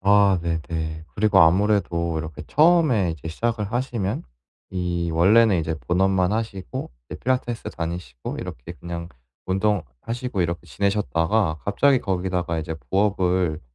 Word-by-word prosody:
아 100 -1 +5
네네. 80 -1 -3
그리고 100 -2 +4
아무래도 85 -2 +3
이렇게 80 -1 -6
처음에 150 - +4
이제 80 0 -7
시작을 110 +4 -2
하시면 120 -6 -1 0.5
이 85 -2 -2
원래는 100 +5 +5
이제 80 0 -1
본업만 95 +1 +2
하시고 105 - -4 0.2
이제 - - -7
필라테스 125 -2 -1
다니시고 85 -7 -5
이렇게 - - -7
그냥 85 0 -7 0.4
운동하시고 100 - -1
이렇게 85 0 -3
지내셨다가 100 -3 0
갑자기 130 +7 +3
거기다가 90 -3 -1
이제 80 0 -4 0.2
부업을 95 -5 +1
95 Hz, 330 characters per minute, -23 LUFS, 85-105 Hz, 0.5 s, 아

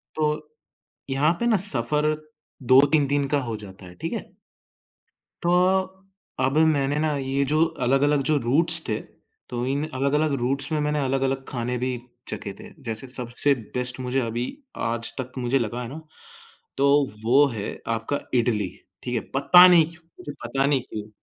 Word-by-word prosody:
तो 150 0 -1 0.6
यहाँ 145 +5 +2
पे 235 - 0
ना 220 -3 +4
सफ़र 150 - +1 0.5
2-3 140 +3 +5
दिन 140 0 +1
का 145 +1 +1
हो 115 -3 -4
जाता 95 -2 -11
है, 90 - -12
ठीक - - -5
है? - - -6 1.1
तो 175 - +2 0.9
अ, - - +1
अब 135 +3 0
मैंने 145 -3 +3
ना 155 -1 +1
ये 135 +1 0
जो 155 +1 +4 0.2
अलग-अलग 140 +3 +3
जो 155 - +4
रूट्स 160 +6 +3
थे, 110 - -1 0.5
तो 120 0 -3
इन 140 +2 0
अलग-अलग 140 +3 +1
रूट्स 135 +4 -1
में 155 - +1
मैंने 150 0 0
अलग-अलग 135 0 0
खाने 125 -1 -3
भी 125 +2 -1 0.4
चखे - - -5
थे - - -10
जैसे 115 +3 -4
सबसे 125 +2 -1 0.2
बेस्ट 125 0 -1
मुझे 130 +1 -1
अभी 120 +1 -2 0.4
आज 115 0 -2
तक 130 0 -4
मुझे 130 +2 +1
लगा 120 +2 -3
है 120 - -5
ना, 155 +5 -8 0.8
तो 140 +1 +3 0.3
वो 135 +5 +5
है 105 -1 -4 0.3
आपका 115 +6 -2 0.2
इडली, 105 -5 0 0.3
ठीक 125 - -3
है, - - 0
पता 180 +6 +8
नहीं 175 -3 +6
क्यों 170 -1 -16 0.2
मुझे 150 -5 -7
पता 135 +3 0
नहीं 140 -3 +2
क्यों 105 -3 -8
135 Hz, 170 wpm, -24 LUFS, 120-150 Hz, 1.1 s, पता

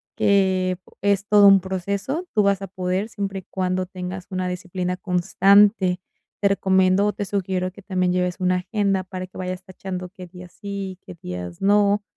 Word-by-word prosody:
que 190 -2 +2 0.2
es 200 0 +1
todo 205 -1 +6
un 195 0 +8
proceso, 200 - -3
tú 215 - +4
vas 200 -1 +2
a 195 - -5
poder, 185 +3 -2
siempre 195 -2 -4
y - - -14
cuando 185 0 -1
tengas 185 0 -7
una 185 -1 -2
disciplina 180 0 -3
constante. 190 +1 +3 0.4
Te 200 - +4
recomiendo, 190 +1 +3
te 205 - -4
sugiero 185 -2 -2
que 205 - -14
también 185 -2 0
lleves 180 -1 0
una 185 0 +2
agenda 195 0 0
para 185 0 -7
que 185 - -14
vayas 185 0 -4
tachando 185 -1 -6
qué 185 -1 -11
días 180 0 -13
sí, 200 -2 -6
qué - - -10
días 90 -1 -7
no. 205 +1 +3
190 Hz, 175 wpm, -23 LUFS, 180-200 Hz, 0.4 s, un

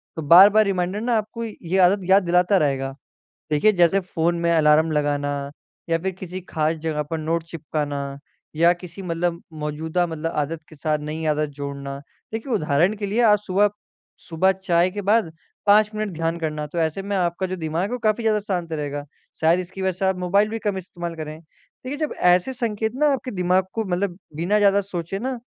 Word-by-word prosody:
तो 160 - -4
बार-बार 195 +8 +7
रिमाइंडर 190 +1 -1
ना 240 +1 +1
आपको 220 +2 -4
ये 190 -5 -3
आदत 200 +2 +1
याद 195 0 +6
दिलाता 180 +3 +3
रहेगा। 135 -4 0 0.6
देखिए 155 +9 +4
जैसे 175 +2 +4
फ़ोन 170 -2 -1
में 170 0 +1
अलार्म 155 0 +4
लगाना 145 -1 -1 0.4
या 165 - +3
फिर 190 +3 -2
किसी 185 0 -6
ख़ास 155 +1 0
जगह 150 -1 -1
पर 165 - -1
नोट 160 +1 -1
चिपकाना 145 -3 -4 0.4
या 170 +2 +5
किसी 175 +1 -10
मतलब 170 -1 -2 0.2
मौजूदा 160 +4 -1
मतलब 165 0 -4
आदत 155 +2 -1
के 155 - -14
साथ 150 +1 -1
नई 155 +2 -4
आदत 150 0 -1
जोड़ना, 140 -1 -5 0.4
देखिए 230 +3 -3
उदाहरण 165 0 +2
के 205 - -4
लिए 210 +5 0
आज 210 -2 +6
सुबह 200 +3 +3 0.6
सुबह 175 +3 +3
चाय 180 -2 +1
के 205 +2 -4
बाद 205 -3 +2 0.3
5 210 +1 +5
मिनट 215 -2 -2
ध्यान 165 +1 -1
करना। 155 -2 -3
तो 160 - -8
ऐसे 160 +3 0
में 200 +1 -3
आपका 175 +1 0
जो 185 - -3
दिमाग 165 0 -2
है, 200 - -2
वो 250 - -1
काफ़ी 220 +1 +1
ज़्यादा 215 -1 +2
शांत 180 -5 -3
रहेगा। 145 -1 -4 0.4
शायद 165 +3 +4
इसकी 185 +1 -7
वज़ह 190 0 +1
से 195 - +1
आप 190 0 +2
मोबाइल 200 +4 +2
भी 225 0 -4
कम 205 -2 -2
इस्तेमाल 175 -2 -6
करें। 155 -1 -7
देखिए 255 - -10
जब 310 -1 -2
ऐसे 180 +8 +3
संकेत 220 -2 -2
ना 295 +1 +3
आपके 255 -1 -4
दिमाग 180 0 +1
को 225 -1 -2
मतलब 180 0 -2 0.2
बिना 175 +6 +1
ज़्यादा 200 0 +4
सोचे 190 -1 -5
ना, 255 +2 -3
175 Hz, 195 wpm, -23 LUFS, 160-200 Hz, 0.6 s, बार-बार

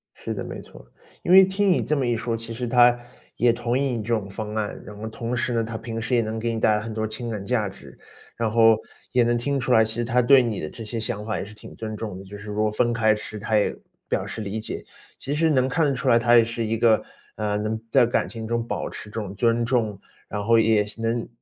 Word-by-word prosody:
是 - - -5
的， - - -4
没 - - -7
错。 - - -14 0.4
因 175 - 0
为 190 +1 +10
听 195 0 +1
你 - - +3
这 150 - 0
么 135 -3 0
一 120 - +1
说， 115 0 -2
其 115 0 -6
实 120 +1 -4
他 120 0 +5 0.4
也 120 0 +4
同 120 +1 -1
意 135 -2 0
你 110 - -3
这 115 +3 -1
种 100 -3 -1
方 105 +1 -5
案， 105 -1 -2
然 105 +1 -9
后 110 +1 -6
同 115 +2 -4
时 120 +1 -1
呢， 115 -1 +1
他 115 0 -5
平 115 0 -5
时 120 +3 0
也 120 - +4
能 110 0 -3
给 115 +1 -1
你 115 - -2
带 110 - +4
来 105 - -1
很 110 0 -6
多 110 0 -2
情 115 +2 -5
感 105 -3 -4
价 115 -4 0
值， 95 - -14 0.4
然 115 -2 0
后 115 -1 +6 0.3
也 125 -2 +4
能 120 0 +2
听 140 +3 -1
出 125 +1 -2
来， 110 -1 +6
其 110 0 -3
实 120 0 -2
他 125 +2 +2
对 135 +2 +6
你 115 -4 -2
的 75 - -4
这 115 - -9
些 115 +1 -4
想 105 -1 -3
法 110 -3 -2
也 - - -4
是 105 - -12
挺 105 - -13
尊 110 -1 -5
重 105 -3 -5
的， 95 - -10
就 100 +2 -9
是 105 +1 -7
说 105 +1 +1
分 120 +2 +1
开 110 -2 +3
吃， 105 0 -7
他 110 0 +1
也 105 - +1 0.3
表 - - -1
示 110 - -6
理 105 +1 -3
解。 - - -6 0.3
其 140 - -4
实 160 +2 +2
能 130 -3 +3
看 155 +5 +2
得 140 - +2
出 130 0 -1
来， 115 -1 +6
他 120 +1 +4
也 115 - +7
是 115 0 -3
一 110 +1 -1
个， 115 -1 +4 0.3
呃， 105 -1 -1
能 110 +1 -2
在 130 -3 +6
感 120 - 0
情 110 -1 -7
中 115 0 -1
保 - - -3
持 105 - -9
这 110 +1 -4
种 100 -1 -6
尊 115 +2 +1
重， 115 -5 0 0.3
然 105 0 -4
后 115 +1 +4
也 110 -2 +3
能， 115 +1 -1
115 Hz, 295 characters per minute, -24 LUFS, 110-120 Hz, 0.4 s, 为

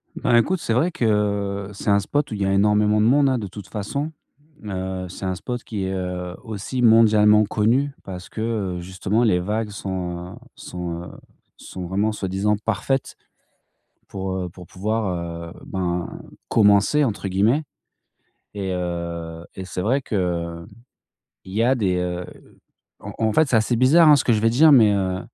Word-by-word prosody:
Ben, 120 - +1
écoute, 165 +11 +3
c'est 115 - -1
vrai 160 +9 +2
que, 100 - 0
c'est 100 - -4
un 100 - +5
spot 145 +7 -1
où - - -3
il 100 - -4
y 95 - +2
a 95 - +1
énormément 105 +1 +3
de - - +3
monde, 140 +3 +4
hein, 130 - +1
de 105 - -4
toute 100 +1 -10
façon. 140 +9 -4 0.5
Heu, 95 -1 -4
c'est 95 - -7
un 95 0 -1
spot 120 +6 -5
qui 100 -4 -4
est 95 0 -2 0.5
aussi, 110 +4 -4
heu, - - +4
mondialement 110 -2 +6
connu 125 +8 +1
parce 95 -1 -8
que, 110 - -6
heu, 105 -6 -2
justement 95 +5 -1
les 90 -6 +3
vagues 105 +4 -2
sont, 90 -3 -5
heu, - - -17
sont, 85 -1 -6
heu, - - -9 0.5
sont 90 -1 -8
vraiment 100 +5 0
soi-disant 100 +1 -1
parfaites 135 +4 -1 0.9
pour, 95 -1 -4
heu, 90 -1 -3
pour 90 +1 -13
pouvoir, 90 -5 -3
heu, - - -15
ben, 90 -2 -2 0.4
«commencer» 105 +7 +4
entre 100 -4 -2
guillemets, 105 +11 +2 0.9
et 95 -2 -3
heu, 85 -2 -4
et 95 - -6
c'est 90 0 -4
vrai 130 +7 +1
qu'il 85 -5 -2 0.8
y 100 +4 -1
a 130 +3 +3
des, 95 -7 0
heu, 90 0 -3 0.7
en - - -8
en 110 -1 +2
fait, 160 +4 +4
c'est 125 - +2
assez 110 +2 +1
bizarre 150 +4 +6
ce - - 0
que 120 - +4
je 105 - +1
vais 115 - +4
dire, 150 +6 +6
mais 110 -5 +6
heu, 95 -2 -1
100 Hz, 180 wpm, -22 LUFS, 95-115 Hz, 0.9 s, mondialement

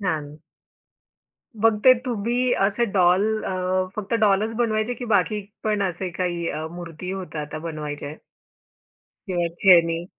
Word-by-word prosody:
छान. 155 -6 -3 1.2
मग 225 -1 +4
ते 255 - +10
तुम्ही 240 +2 0
असे 210 +4 0
डॉल 185 +1 +4 0.2
अ, - - -3 0.5
फक्त 215 +2 -3
डॉलच 210 +1 +3
बनवायचे 225 0 0
की 245 +1 -7
बाकी 210 0 +1 0.2
पण 210 -2 +1
असे 180 +2 -4
काही 175 -1 -2
अ, 155 +1 -4
मूर्ती 175 +1 -7
होत्या 180 -5 -5
त्या 155 +1 -7
बनवायचे? 150 -2 -5 1.1
किंवा 175 -2 0 0.2
खेळणी? 170 -3 +5
185 Hz, 130 wpm, -23 LUFS, 165-215 Hz, 1.2 s, ते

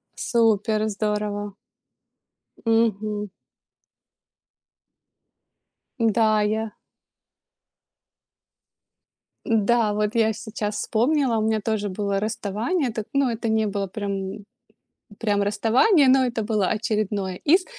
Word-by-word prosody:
Супер, 220 -2 +1
здорово. 210 -1 -2 1.1
Мгм. 215 -2 +1 2.7
Да, 220 -2 +3
я 215 +1 -1 2.7
Да, 225 0 +2
вот 210 +1 -1
я 220 -1 +3
сейчас 215 -1 -5
вспомнила, 250 +3 +1
у - - 0
меня 220 0 +1
тоже 210 -1 -1
было 200 0 -2
расставание. 225 - -1
Это, 220 -1 -4
ну, 275 -1 +2
это 230 0 -3
не 220 0 +2
было 200 -1 -2
прям 200 0 -5 0.8
прям 205 -3 +1
расставание, 230 - +3
но 260 0 +5
это 235 -3 -2
было 210 -3 0
очередное 210 -3 -1
из, 360 - +3
215 Hz, 95 wpm, -23 LUFS, 205-230 Hz, 2.7 s, но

